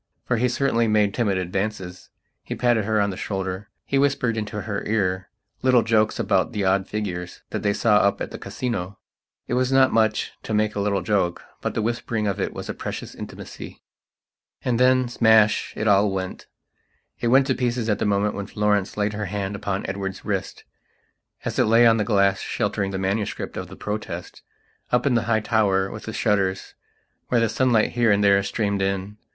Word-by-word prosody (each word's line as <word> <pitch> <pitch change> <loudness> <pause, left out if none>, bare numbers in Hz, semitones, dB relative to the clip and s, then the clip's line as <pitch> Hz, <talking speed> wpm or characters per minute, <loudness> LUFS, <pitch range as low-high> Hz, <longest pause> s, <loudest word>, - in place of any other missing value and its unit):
For 120 - +1
he 125 +2 +2
certainly 120 -2 +1
made 105 -2 +2
timid 105 -6 +1
advances. 95 0 -4 0.3
He - - -6
patted 120 -4 +2
her 110 0 +1
on 100 -1 +1
the 95 - -7
shoulder; 95 0 -4 0.2
he 135 - +1
whispered 135 -4 +1
into 105 -1 -4
her 100 0 -4
ear 95 -4 0 0.3
little 125 -3 +4
jokes 110 -1 +2
about - - +1
the 100 -2 -1
odd 95 +1 +2
figures 90 -4 -5
that - - -3
they 100 - +1
saw 105 +1 +3
up 100 -1 +2
at - - -4
the - - -7
Casino. 100 -6 -4 0.5
It - - -3
was 130 +1 +1
not 135 -1 +4
much 110 -1 +2
to 110 - -3
make 105 0 +1
a - - -3
little 100 -2 0
jokebut 90 -3 -2
the 110 - 0
whispering 115 -1 -2
of 100 -2 -1
it - - -1
was - - -7
a - - -3
precious - - -6
intimacy.... - - -9 0.8
And 125 -2 +1
thensmashit 120 -4 +3
all 100 0 +4
went. 95 -1 -5 0.7
It 120 - -1
went 130 +3 +5
to 130 - +1
pieces 120 -2 -1
at 105 -2 +1
the - - 0
moment 105 +1 +1
when 100 -1 -5
Florence 105 -2 0
laid 105 0 0
her 105 0 -3
hand 100 +1 -3
upon 100 -1 -3
Edward's 95 0 -5
wrist, - - -3 0.8
as - - -2
it - - +5
lay 115 +2 +5
on 115 -1 +6
the 105 - +1
glass 100 -2 +2
sheltering 100 -1 -1
the 95 - -3
manuscript 100 +3 -2
of - - -5
the - - -11
Protest, 105 +1 -5 0.5
up 125 +2 +2
in 140 - +3
the 115 -1 +1
high 110 -1 +3
tower 100 -4 +1
with 105 - -8
the 110 - -4
shutters 95 -4 0 0.5
where 120 - +2
the 115 - +3
sunlight 115 -1 +2
here 120 -2 +2
and 100 0 +3
there 100 -1 +5
streamed 100 0 -1
in. 95 +1 -2
105 Hz, 190 wpm, -23 LUFS, 100-115 Hz, 0.8 s, on